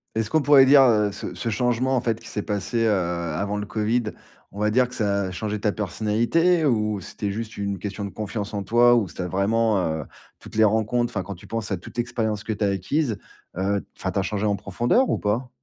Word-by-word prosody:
Est-ce 110 -1 -1
qu'on 155 - +2
pourrait 140 -1 +7
dire, 140 +1 +7
heu, 105 -4 +3
ce 100 - -6
ce 115 - -3
changement 125 +3 +1
en - - +3
fait 115 -2 -1
qui - - -10
s'est 105 - -3
passé, 105 +3 -1
heu, - - +3
avant 90 +1 -1
le 105 - -3
covid, 110 +3 0 0.5
on 100 - -6
va 105 - +3
dire 125 +2 +3
que 125 - -8
ça 100 -3 0
a 95 - -4
changé 105 +3 -3
ta 105 0 0
personnalité? 115 - +1
Ou 105 -6 +1
c'était 100 +3 -4
juste 110 +1 -6
une 100 -2 -3
question 100 +1 -5
de - - -5
confiance 105 0 -5
en 100 -1 -2
toi? 120 +4 +5
Ou 105 -7 +1
c'était 90 - -5
vraiment, 105 +3 +1
heu, 80 -1 -2 0.3
toutes - - -12
les 110 - +5
rencontres, 110 +3 +1
enfin 95 - -2
quand 100 0 -7
tu 85 - -15
penses 115 -2 -3
à 95 - 0
toute 90 - -12
l'expérience 110 -3 -2
que 110 - -1
tu 105 - -3
as 100 - +3
acquise, 110 - -1 0.4
heu, 100 +1 0
enfin 95 - -2
tu 100 - -1
as - - +2
changé 105 +2 -2
en 100 -1 +2
profondeur 120 - +1
ou - - +1
pas? 115 +5 -1
105 Hz, 240 wpm, -24 LUFS, 100-120 Hz, 0.5 s, pourrait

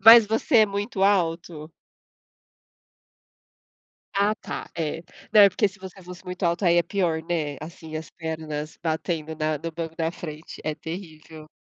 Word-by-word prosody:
mas 225 +2 +10
você 225 +2 +3
é 215 - +7
muito 200 0 -2
alto? 170 -5 +1 2.4
Ah, 200 +2 +3
tá, - - -6
é. 165 0 -2 0.3
Não, 215 - +8
é 200 - +10
porque 200 +3 +2
se 195 0 -7
você 190 0 -10
fosse 180 0 -10
muito 180 +1 -7
alto, 170 +2 +1
aí 170 0 +5
é 175 - +5
pior, 170 -4 0
né? 160 -4 -2
Assim, 160 -1 -8
as 160 - -6
pernas 155 -2 -5
batendo 160 -1 -2
na 155 0 0
no 165 +3 -5
banco 165 0 -5
da 165 0 0
frente, 155 -2 -8
é 155 -1 -1
terrível. 160 -2 -8
165 Hz, 160 wpm, -25 LUFS, 160-190 Hz, 2.4 s, mas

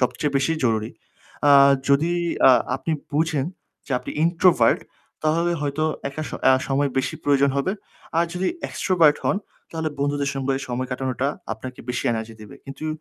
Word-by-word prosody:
সবচেয়ে 140 +3 0
বেশি 140 +4 +1
জরুরি। 110 -1 0 0.6
আ - - +6 0.4
যদি 150 +5 +3 0.4
আ - - +9 0.3
আপনি 160 +4 -3 0.2
বুঝেন 155 -2 0 0.4
যে 135 - -4
আপনি - - -8
introvert 170 +1 +4 0.4
তাহলে 165 +3 +2
হয়তো 145 +2 -1 0.2
একা 140 +3 -5
স - - -10 0.2
আ - - +7 0.2
সময় 140 0 +1
বেশি 130 - -1
প্রয়োজন 140 -1 +3
হবে। 140 +7 0 0.5
আর 170 - +4
যদি 185 +1 0 0.2
extrovert 170 -6 +3
হন - - +2 0.3
তাহলে 160 -1 -2
বন্ধুদের 140 0 0
সঙ্গে 135 0 -1
সময় 125 +1 -3
কাটানোটা 130 +1 -1 0.2
আপনাকে 125 +4 -8
বেশি 125 - -2
energy 110 0 -4
দেবে। 110 +6 -11
কিন্তু 135 +3 -7
140 Hz, 155 wpm, -23 LUFS, 130-160 Hz, 0.6 s, আ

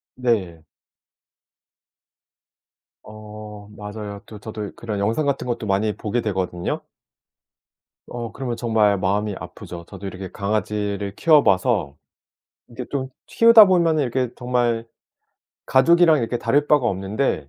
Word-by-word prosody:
네. 100 -10 -1 2.4
어 105 -1 -11
맞아요. 105 -1 -7
또 110 - -11
저도 105 -1 -7
그런 110 -3 -4
영상 115 +9 0
같은 140 -2 -1
것도 120 -2 -3
많이 105 +2 0
보게 110 +3 -2
되거든요. 95 -4 -2 1.3
어 120 -2 -6
그러면 125 -3 -4
정말 110 -4 +2
마음이 100 +2 -1
아프죠. 90 -1 -9
저도 100 0 -9
이렇게 95 -1 -7
강아지를 100 -1 -2
키워 155 -3 +4
봐서 85 -6 +1 0.7
이게 120 +1 -7
좀 130 -2 -2 0.2
키우다 230 -2 +7
보면은 170 -5 +3
이렇게 125 -1 -1
정말 120 -2 0 0.8
가족이랑 165 +3 +5
이렇게 120 +1 -1
다를 145 +4 +1
바가 145 -5 +3
없는데 95 - -1
110 Hz, 265 characters per minute, -22 LUFS, 100-125 Hz, 2.4 s, 키우다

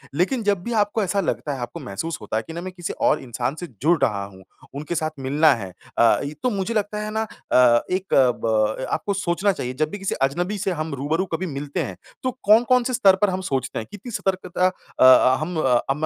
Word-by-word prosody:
लेक़िन 215 - +1
जब 200 -3 +1
भी 235 - -3
आपको 210 0 +1
ऐसा 200 +1 0
लगता 150 -3 -2
है, 135 - -6
आपको 120 0 -6
महसूस 160 +12 -5
होता 105 +1 -3
है 110 - -2
कि 160 - -7
ना 170 - -5
मैं 185 0 -6
किसी 175 -2 -5
और - - 0
और 150 - +2
इंसान 125 +3 -3
से 175 - -5 0.2
जुड़ 165 +3 +4
रहा 100 -3 +1
हूँ, 95 -1 -14 0.3
उनके 150 +4 -4
साथ 155 0 0
मिलना 145 +4 +4
है 95 -5 -6 0.3
अ, 115 - +5
इ 145 +2 -5
तो 250 - +3
मुझे 200 +1 -2
लगता 210 -1 -1
है 215 - -4
ना 220 +1 -1 0.3
अ, 120 -2 +6
एक 185 +1 -2
अ, 130 -2 +5
ब 110 +2 +1
आपको 200 - -1
सोचना 195 +1 +1
चाहिए 125 -9 -4
जब 155 +3 -1
भी 205 - -6
किसी 195 - -2
अजनबी 175 +9 0
से 190 -1 -1
हम 155 -2 -3
रूबरू 155 +7 -1
कभी 185 +3 -1
मिलते 145 -2 -4
हैं, - - -6 0.3
तो 255 - 0
कौन-कौन 240 +4 +5
से 255 - -2
स्तर 195 -6 +5
पर 210 - +4
हम 185 0 -2
सोचते 135 -8 -2
हैं 110 - -6
कितनी 210 +4 -9
सतर्कता 185 -2 0
अ 185 - -3
अ, 130 0 +7
हम 170 +3 -3
अ, 125 -2 +3
हम 150 +3 0
170 Hz, 245 wpm, -23 LUFS, 130-200 Hz, 0.3 s, अ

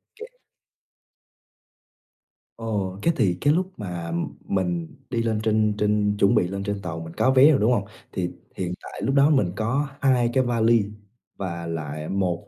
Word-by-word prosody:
kê. 455 - -8 2.3
Ồ, 100 -5 -3
cái 170 - +2
thì 90 -4 +2
cái 145 +1 +4
lúc 185 +2 0
mà 90 -5 -5 0.3
mình 90 -4 -1 0.2
đi 115 -2 0
lên 110 -2 0
trên 110 -1 +2
trên 105 -1 +1
chuẩn 100 - +4
bị 90 - +3
lên 100 +1 -4
trên 100 0 -3
tàu, 80 -3 -5
mình 80 0 -8
có 130 - +3
vé 135 +4 +7
rồi, 135 - +3
đúng 110 +4 +3
hông? 100 -5 +1 0.3
Thì 90 -1 -2 0.3
hiện 90 -1 -2
tại - - -9
lúc 135 - +1
đó 140 +2 +6
mình 130 - +3
có 125 +7 0
2 125 -3 +3
cái 130 - +3
vali 115 -2 +3 0.5
và 85 -3 -4
lại 75 -2 -4
1 95 -3 -1
105 Hz, 175 wpm, -24 LUFS, 90-120 Hz, 2.3 s, vé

